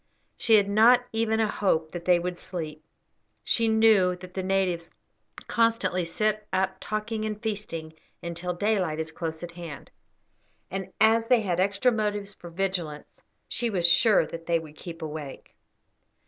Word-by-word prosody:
She 225 Hz, -, +4 dB
had 205 Hz, -2 st, +4 dB
not 235 Hz, +5 st, +5 dB
even 225 Hz, 0 st, +1 dB
a 220 Hz, -, +3 dB
hope 165 Hz, -7 st, 0 dB
that 175 Hz, -1 st, -7 dB
they 180 Hz, -1 st, +5 dB
would 175 Hz, 0 st, -4 dB
sleep. 155 Hz, -4 st, -6 dB, 0.6 s
She 230 Hz, -1 st, +2 dB
knew 220 Hz, -5 st, +4 dB
that 180 Hz, 0 st, -12 dB
the 190 Hz, -, -2 dB
natives 185 Hz, -3 st, 0 dB, 0.6 s
constantly 225 Hz, -6 st, +1 dB
sit 215 Hz, +5 st, 0 dB
up 190 Hz, 0 st, 0 dB
talking 215 Hz, +2 st, -3 dB
and 215 Hz, -1 st, -3 dB
feasting 200 Hz, -8 st, -4 dB, 0.3 s
until 170 Hz, +1 st, -3 dB
daylight 185 Hz, -5 st, 0 dB
is 160 Hz, 0 st, -3 dB
close 160 Hz, 0 st, -5 dB
at 175 Hz, -, -6 dB
hand; 170 Hz, -5 st, -9 dB, 0.8 s
and 190 Hz, 0 st, -4 dB
as 225 Hz, +1 st, +4 dB
they 245 Hz, -2 st, +4 dB
had 180 Hz, -4 st, -1 dB
extra 200 Hz, +6 st, +2 dB
motives 205 Hz, -2 st, -2 dB
for 175 Hz, -, -11 dB
vigilance, 170 Hz, -4 st, -3 dB, 0.3 s
she 240 Hz, -2 st, -2 dB
was 180 Hz, -5 st, +3 dB
sure 180 Hz, +1 st, +5 dB
that 165 Hz, +1 st, -9 dB
they 170 Hz, -1 st, +3 dB
would 155 Hz, -2 st, -9 dB
keep 165 Hz, -1 st, -8 dB
awake. 150 Hz, -3 st, -7 dB
190 Hz, 160 wpm, -27 LUFS, 170-215 Hz, 0.8 s, not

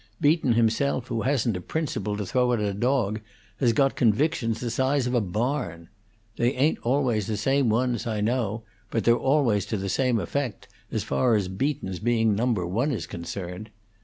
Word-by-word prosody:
Beaton 145 Hz, -4 st, +3 dB
himself, 120 Hz, +3 st, +1 dB
who 115 Hz, -2 st, -1 dB
hasn't 125 Hz, -4 st, +1 dB
a 90 Hz, -, -4 dB
principle 105 Hz, -, -2 dB
to 105 Hz, -, -3 dB
throw 125 Hz, +5 st, +1 dB
at 120 Hz, -, +1 dB
a 105 Hz, -1 st, -1 dB
dog, 110 Hz, -1 st, 0 dB, 0.4 s
has 120 Hz, -3 st, +3 dB
got 135 Hz, +4 st, +2 dB
convictions 115 Hz, 0 st, +1 dB
the 120 Hz, -1 st, -3 dB
size 130 Hz, +2 st, +1 dB
of 125 Hz, -, -1 dB
a 120 Hz, -, +3 dB
barn. 100 Hz, -, -2 dB, 0.5 s
They 120 Hz, +2 st, +2 dB
ain't 140 Hz, +5 st, +2 dB
always 120 Hz, -5 st, +1 dB
the 110 Hz, -2 st, -2 dB
same 135 Hz, +3 st, +2 dB
ones, 120 Hz, +1 st, 0 dB
I 110 Hz, -2 st, -1 dB
know, 115 Hz, 0 st, -1 dB, 0.3 s
but 115 Hz, -, -1 dB
they're 120 Hz, -, +5 dB
always 130 Hz, -6 st, +2 dB
to 110 Hz, -, -2 dB
the 100 Hz, 0 st, -3 dB
same 125 Hz, +3 st, +1 dB
effect, 130 Hz, -2 st, -3 dB, 0.2 s
as 110 Hz, -, -1 dB
far 125 Hz, -3 st, +2 dB
as 100 Hz, -3 st, 0 dB
Beaton's 95 Hz, -2 st, -2 dB
being 115 Hz, -1 st, +2 dB
Number 110 Hz, -3 st, 0 dB
One 115 Hz, +12 st, 0 dB
is 100 Hz, -, -3 dB
concerned. 90 Hz, +4 st, -6 dB
115 Hz, 185 wpm, -26 LUFS, 105-130 Hz, 0.5 s, they're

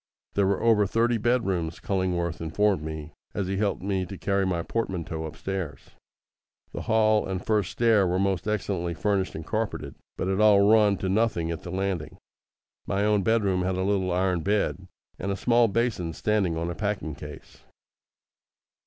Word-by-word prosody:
There 100 Hz, -1 st, +2 dB
were 100 Hz, 0 st, 0 dB
over 110 Hz, -3 st, +4 dB
thirty 115 Hz, +3 st, +1 dB
bedrooms, 95 Hz, -9 st, 0 dB
Cullingworth 90 Hz, -4 st, -1 dB
informed 95 Hz, +2 st, +1 dB
me, 80 Hz, 0 st, -6 dB, 0.2 s
as 100 Hz, -, -1 dB
he 95 Hz, +1 st, -2 dB
helped 100 Hz, -2 st, -1 dB
me 95 Hz, -1 st, 0 dB
to 95 Hz, -, -8 dB
carry 100 Hz, 0 st, 0 dB
my 85 Hz, -2 st, -1 dB
portmanteau 85 Hz, -8 st, -3 dB
upstairs. 85 Hz, +2 st, -5 dB, 0.8 s
The -, -, -5 dB
hall 110 Hz, -1 st, +3 dB
and 95 Hz, -1 st, -4 dB
first 105 Hz, -5 st, +1 dB
stair 110 Hz, -5 st, +3 dB
were 90 Hz, +1 st, 0 dB
most 95 Hz, 0 st, 0 dB
excellently 95 Hz, -5 st, -1 dB
furnished 100 Hz, 0 st, 0 dB
and 80 Hz, -, -6 dB
carpetted, 110 Hz, +3 st, -3 dB, 0.2 s
but -, -, -2 dB
it 95 Hz, +2 st, +1 dB
all 105 Hz, -2 st, +6 dB
run 105 Hz, -2 st, +5 dB
to 95 Hz, -, -3 dB
nothing 95 Hz, -5 st, +1 dB
at 85 Hz, -, -5 dB
the -, -, -8 dB
landing. 95 Hz, -3 st, -3 dB, 0.7 s
My 100 Hz, +1 st, +1 dB
own 105 Hz, -1 st, +3 dB
bedroom 100 Hz, -3 st, +2 dB
had 95 Hz, 0 st, 0 dB
a 95 Hz, -, -1 dB
little 95 Hz, -2 st, +1 dB
iron 90 Hz, -1 st, +1 dB
bed, 100 Hz, -1 st, 0 dB, 0.3 s
and 100 Hz, -, -2 dB
a 100 Hz, -, -2 dB
small 120 Hz, +1 st, +4 dB
basin 105 Hz, -6 st, -1 dB
standing 100 Hz, -4 st, 0 dB
on 85 Hz, +1 st, -2 dB
a -, -, -3 dB
packing 100 Hz, -5 st, -3 dB
case. 75 Hz, +1 st, -11 dB
95 Hz, 170 wpm, -26 LUFS, 90-105 Hz, 0.8 s, all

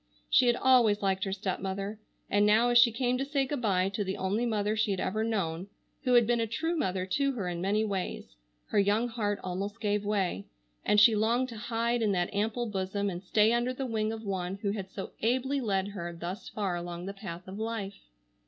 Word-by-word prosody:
She 250 Hz, -, +5 dB
had 240 Hz, -, +4 dB
always 240 Hz, -6 st, +4 dB
liked 190 Hz, -1 st, +1 dB
her 195 Hz, -, -3 dB
stepmother. 195 Hz, +1 st, -3 dB, 0.3 s
And 205 Hz, +1 st, +2 dB
now, 220 Hz, +3 st, +4 dB
as 240 Hz, 0 st, +6 dB
she 240 Hz, 0 st, +6 dB
came 250 Hz, +2 st, 0 dB
to -, -, 0 dB
say 275 Hz, -1 st, 0 dB
good 275 Hz, -1 st, -3 dB
bye 190 Hz, -4 st, +2 dB
to 205 Hz, +1 st, -2 dB
the 190 Hz, 0 st, -3 dB
only 205 Hz, +6 st, 0 dB
mother 210 Hz, -1 st, 0 dB
she 220 Hz, -1 st, +1 dB
had 195 Hz, -2 st, -1 dB
ever 215 Hz, +3 st, -1 dB
known, 190 Hz, -6 st, -2 dB, 0.4 s
who 250 Hz, -1 st, +4 dB
had 240 Hz, -1 st, +6 dB
been 240 Hz, +1 st, +1 dB
a 225 Hz, -, 0 dB
true 325 Hz, +9 st, -1 dB
mother 190 Hz, -, -1 dB
to 275 Hz, +8 st, 0 dB
her 205 Hz, -7 st, -3 dB
in 175 Hz, -1 st, -3 dB
many 205 Hz, +3 st, +1 dB
ways, 195 Hz, -, -4 dB, 0.3 s
her -, -, +2 dB
young 210 Hz, +4 st, +2 dB
heart 210 Hz, -3 st, -1 dB
almost 195 Hz, +3 st, -4 dB
gave 210 Hz, -1 st, 0 dB
way, 195 Hz, -, -1 dB, 0.4 s
and 210 Hz, -, +4 dB
she 220 Hz, +1 st, +7 dB
longed 235 Hz, +4 st, +1 dB
to 230 Hz, -, -8 dB
hide 235 Hz, +2 st, -1 dB
in 210 Hz, -3 st, +2 dB
that 175 Hz, 0 st, -1 dB
ample 220 Hz, +4 st, 0 dB
bosom 200 Hz, -1 st, -2 dB
and 175 Hz, 0 st, -6 dB
stay 210 Hz, +3 st, +3 dB
under 240 Hz, +2 st, +1 dB
the 270 Hz, -, -3 dB
wing 220 Hz, -3 st, -1 dB
of 225 Hz, 0 st, -6 dB
one 190 Hz, -2 st, -2 dB
who 200 Hz, -, +1 dB
had 195 Hz, -2 st, -5 dB
so 190 Hz, 0 st, -7 dB
ably 260 Hz, +4 st, +1 dB
led 200 Hz, -4 st, 0 dB
her 175 Hz, -4 st, -5 dB
thus 175 Hz, +5 st, -6 dB
far 195 Hz, -4 st, -2 dB
along 175 Hz, 0 st, -5 dB
the 195 Hz, -, -5 dB
path 185 Hz, -3 st, -8 dB
of 190 Hz, +2 st, -7 dB
life. 220 Hz, -3 st, -4 dB
210 Hz, 225 wpm, -29 LUFS, 190-230 Hz, 0.4 s, she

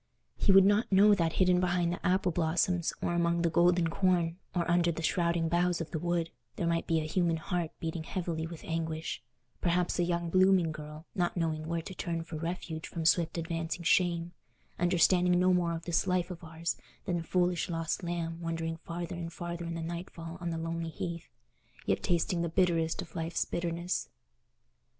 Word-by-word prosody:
He 200 Hz, -, +2 dB
would 195 Hz, 0 st, +8 dB
not 205 Hz, +3 st, +3 dB
know 205 Hz, +2 st, +7 dB
that 165 Hz, -5 st, +1 dB
hidden 180 Hz, -1 st, +4 dB
behind 175 Hz, -1 st, +1 dB
the -, -, -7 dB
apple 185 Hz, 0 st, +2 dB
blossoms, 170 Hz, +1 st, +1 dB
or -, -, 0 dB
among 170 Hz, 0 st, +1 dB
the 170 Hz, -, +2 dB
golden 175 Hz, 0 st, +4 dB
corn, 175 Hz, -1 st, +1 dB, 0.2 s
or 170 Hz, -1 st, 0 dB
under 175 Hz, 0 st, +3 dB
the 165 Hz, 0 st, -5 dB
shrouding 170 Hz, 0 st, +1 dB
boughs 175 Hz, +1 st, +1 dB
of 165 Hz, -2 st, -5 dB
the 160 Hz, -, -2 dB
wood, 170 Hz, 0 st, -1 dB, 0.2 s
there 175 Hz, -, -2 dB
might 170 Hz, 0 st, 0 dB
be 165 Hz, -1 st, +2 dB
a -, -, -2 dB
human 170 Hz, +1 st, +1 dB
heart 170 Hz, 0 st, -2 dB
beating 165 Hz, 0 st, -3 dB
heavily 165 Hz, -3 st, -3 dB
with 165 Hz, -1 st, -9 dB
anguish—perhaps 160 Hz, +1 st, -2 dB
a -, -, +4 dB
young 170 Hz, -1 st, -1 dB
blooming 185 Hz, -2 st, +4 dB
girl, 150 Hz, +1 st, -9 dB
not 175 Hz, 0 st, 0 dB
knowing 160 Hz, -2 st, -1 dB
where 165 Hz, 0 st, -2 dB
to 190 Hz, -, -7 dB
turn 170 Hz, -2 st, -3 dB
for 165 Hz, -1 st, -7 dB
refuge 165 Hz, -1 st, -4 dB
from 165 Hz, -2 st, -5 dB
swift 165 Hz, +1 st, +3 dB
advancing 165 Hz, +1 st, -3 dB
shame, 170 Hz, -1 st, +2 dB, 0.5 s
understanding 180 Hz, 0 st, +4 dB
no 185 Hz, 0 st, +4 dB
more 175 Hz, -2 st, +1 dB
of 165 Hz, -, -7 dB
this 170 Hz, -1 st, +1 dB
life 180 Hz, 0 st, +1 dB
of 170 Hz, -1 st, -8 dB
ours 165 Hz, +1 st, -3 dB, 0.3 s
than 175 Hz, -3 st, 0 dB
a -, -, -3 dB
foolish 180 Hz, 0 st, +1 dB
lost 165 Hz, +1 st, -2 dB
lamb 170 Hz, -1 st, -3 dB
wandering 165 Hz, -1 st, -2 dB
farther 170 Hz, +1 st, -5 dB
and 170 Hz, -1 st, -5 dB
farther 170 Hz, 0 st, -5 dB
in 170 Hz, 0 st, -4 dB
the 165 Hz, -, -4 dB
nightfall 170 Hz, 0 st, -6 dB
on 175 Hz, -, -2 dB
the 165 Hz, -, -2 dB
lonely 165 Hz, 0 st, -3 dB
heath, 170 Hz, +1 st, -5 dB, 0.6 s
yet -, -, +1 dB
tasting 170 Hz, 0 st, +1 dB
the 170 Hz, -, -1 dB
bitterest 165 Hz, 0 st, +1 dB
of 170 Hz, -, -16 dB
life's 165 Hz, 0 st, -1 dB
bitterness. 170 Hz, +1 st, -2 dB
170 Hz, 190 wpm, -31 LUFS, 165-175 Hz, 0.6 s, would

